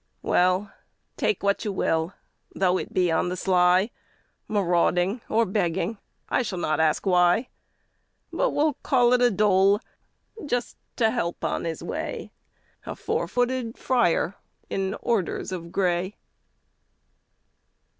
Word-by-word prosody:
Well, 185 +3 +2 0.4
take 425 - 0
what 200 0 +1
you 210 - -2
will, 165 -1 -1 0.4
though 185 -1 +2
it - - -6
be 180 -2 +2
on 165 +2 +1
the 180 - -3
sly, 185 +3 +3 0.6
Marauding 180 +1 +1
or 230 +1 +3
begging, 200 +2 -1 0.3
I - - +1
shall 210 -6 -4
not 155 -3 0
ask 160 +3 +2
why, 180 +5 +3 0.8
But - - +1
will 300 -4 +1
call 245 -2 +3
it 250 - +3
a 245 - +5
dole, 200 -1 +3 0.6
just 245 -4 -2 0.2
to 225 -2 +2
help 175 -8 -3
on - - -1
his 165 -1 -4
way - - -5 0.5
A - - -6
four - - -2
footed 245 -1 -1
friar 235 -8 +1 0.4
in 195 +1 -1
orders 215 -6 -1
of 170 -2 -6
gray! 185 +1 0
195 Hz, 130 wpm, -25 LUFS, 180-230 Hz, 0.8 s, a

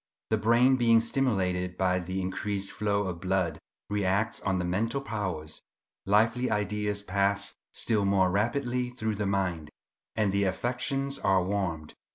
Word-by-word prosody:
The 110 - +4
brain, 120 +4 +4
being 115 -2 +5
stimulated 95 -8 0
by 90 -1 +2
the 95 +2 -3
increased 100 +1 -2
flow 100 -1 0
of 90 -2 -5
blood, 90 -4 0 0.3
reacts 105 +2 0
on 95 -2 0
the 90 - -1
mental 110 +9 0
powers; 95 - -4 0.5
lively 115 +5 +3
ideas 105 0 -1
pass 100 +1 +1 0.2
still 110 -3 +1
more 95 -2 +3
rapidly 125 +4 0
through 110 -3 -3
the 105 -1 -2
mind, 90 -6 -1 0.5
and 105 -3 +1
the 100 +1 +1
affections 130 +7 -1
are 95 -1 +3
warmed. 90 -5 -2
100 Hz, 145 wpm, -28 LUFS, 95-115 Hz, 0.5 s, being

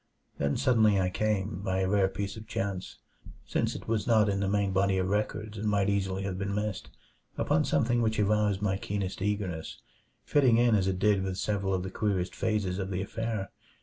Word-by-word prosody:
Then 70 0 +1
suddenly 110 -6 +4
I 90 -1 +1
came 100 -2 -1
by 95 -1 -1
a 95 - +1
rare 100 0 +3
piece 100 +1 -4
of 110 0 -10
chance, 95 -4 -4 0.5
since - - -1
it - - -8
was 110 -2 -1
not 110 -3 +4
in 100 -1 0
the 100 -1 0
main 100 -1 +1
body 95 0 +2
of 95 0 0
records 105 +1 -2
and 105 +1 0
might 100 -1 +2
easily 95 -1 -1
have 95 -1 -3
been 100 0 -2
missed 105 0 -3 0.5
upon - - +2
something 120 0 +2
which 110 -1 0
aroused 105 -1 +2
my 95 -2 +1
keenest 100 -2 -4
eagerness, 95 -5 -2 0.4
fitting 130 -6 +4
in 120 -1 +4
as 95 -3 +2
it 95 -1 0
did 100 0 +3
with 95 -1 -3
several 100 -2 -1
of 90 - -2
the 95 - -5
queerest 95 -4 -1
phases 100 -4 -1
of 95 -1 -3
the 95 0 -2
affair. 110 -1 -3
100 Hz, 205 wpm, -29 LUFS, 95-105 Hz, 0.5 s, suddenly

